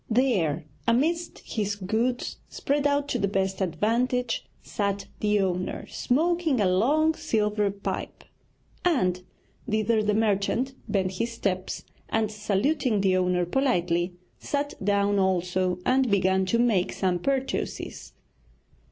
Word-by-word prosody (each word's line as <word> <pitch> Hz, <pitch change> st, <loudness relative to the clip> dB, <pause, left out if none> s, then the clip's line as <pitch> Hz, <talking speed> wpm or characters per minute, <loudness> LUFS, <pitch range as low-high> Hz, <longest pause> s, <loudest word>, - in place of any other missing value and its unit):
There, 195 Hz, -, +1 dB, 0.2 s
amidst 320 Hz, +9 st, +1 dB
his 205 Hz, -2 st, -2 dB
goods, 220 Hz, +6 st, -1 dB
spread 285 Hz, +1 st, 0 dB
out 285 Hz, 0 st, +1 dB
to 245 Hz, -, 0 dB
the 200 Hz, -, +1 dB
best 190 Hz, 0 st, -1 dB
advantage, 230 Hz, +7 st, 0 dB, 0.2 s
sat 200 Hz, -1 st, -2 dB
the 210 Hz, 0 st, +2 dB
owner 185 Hz, -1 st, -2 dB
smoking 320 Hz, 0 st, +1 dB
a 205 Hz, -, +3 dB
long 280 Hz, +13 st, +3 dB
silver 210 Hz, -5 st, 0 dB
pipe, 200 Hz, 0 st, -5 dB, 0.6 s
and 185 Hz, -, +2 dB, 0.5 s
thither 215 Hz, +1 st, +2 dB
the 210 Hz, -1 st, +1 dB
merchant 220 Hz, +4 st, +1 dB, 0.2 s
bent 190 Hz, -3 st, +1 dB
his 230 Hz, +5 st, -2 dB
steps, 185 Hz, -4 st, -2 dB, 0.3 s
and 220 Hz, -1 st, 0 dB
saluting 215 Hz, +3 st, +1 dB
the 190 Hz, -1 st, +3 dB
owner 180 Hz, -1 st, +2 dB
politely, 175 Hz, -6 st, +1 dB, 0.2 s
sat 285 Hz, 0 st, -2 dB
down 200 Hz, 0 st, +2 dB
also 185 Hz, -1 st, +1 dB
and 260 Hz, -1 st, +3 dB
began 190 Hz, -1 st, +2 dB
to 230 Hz, -, +2 dB
make 225 Hz, -7 st, +2 dB
some 180 Hz, -2 st, 0 dB
purchases. 270 Hz, +5 st, -3 dB
210 Hz, 125 wpm, -26 LUFS, 190-250 Hz, 0.6 s, a